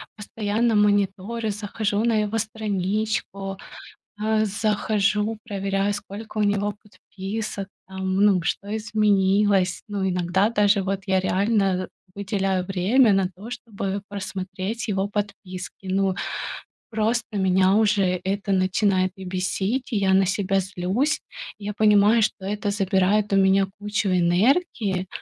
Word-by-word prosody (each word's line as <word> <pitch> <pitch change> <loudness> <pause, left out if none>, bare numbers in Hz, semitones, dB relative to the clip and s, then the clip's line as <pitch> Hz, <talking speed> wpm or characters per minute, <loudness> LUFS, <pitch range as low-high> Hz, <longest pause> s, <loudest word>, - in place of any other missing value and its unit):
постоянно 215 +2 -1
мониторю, 205 +2 +1
захожу 205 +1 -2
на 235 - +2
его 210 +2 -1
страничку, 210 -2 -2 0.6
а, 220 0 +1
захожу, 210 +1 0
проверяю, 195 -1 -1
сколько 205 +2 -7
у 210 - +3
него 205 0 +1
подписок, 205 0 -6 0.2
там 190 0 -3
ну 195 -3 +4
что 200 +5 -2
изменилось. 200 -3 +2
Ну, 200 -2 -2
иногда 180 +3 +1
даже 205 -3 +3
вот 195 +1 -2
я 190 -1 +2
реально 190 0 +1 0.3
выделяю 195 -2 -1
время 200 +6 +3
на 195 -1 +2
то, 210 +6 -9
чтобы 200 -5 -4
просмотреть 195 +2 -5
его 195 -1 0
подписки. 195 -3 -6
Ну, 190 0 +1 0.8
просто 225 +1 0
меня 190 0 +3
уже 200 -4 +2
это 200 +1 -2
начинает 185 0 +2
и 190 - -9
бесить, 190 +7 -2
и - - +1
я 195 -1 +2
на 190 0 +4
себя 195 0 +1
злюсь. 195 - -1 0.4
Я 210 0 -4
понимаю, 210 +2 +5
что 210 -2 -1
это 205 +1 -2
забирает 200 +1 +1
у 195 - +4
меня 195 0 +4
кучу 210 0 -1
энергии, 190 - +2
200 Hz, 125 wpm, -24 LUFS, 190-215 Hz, 0.8 s, понимаю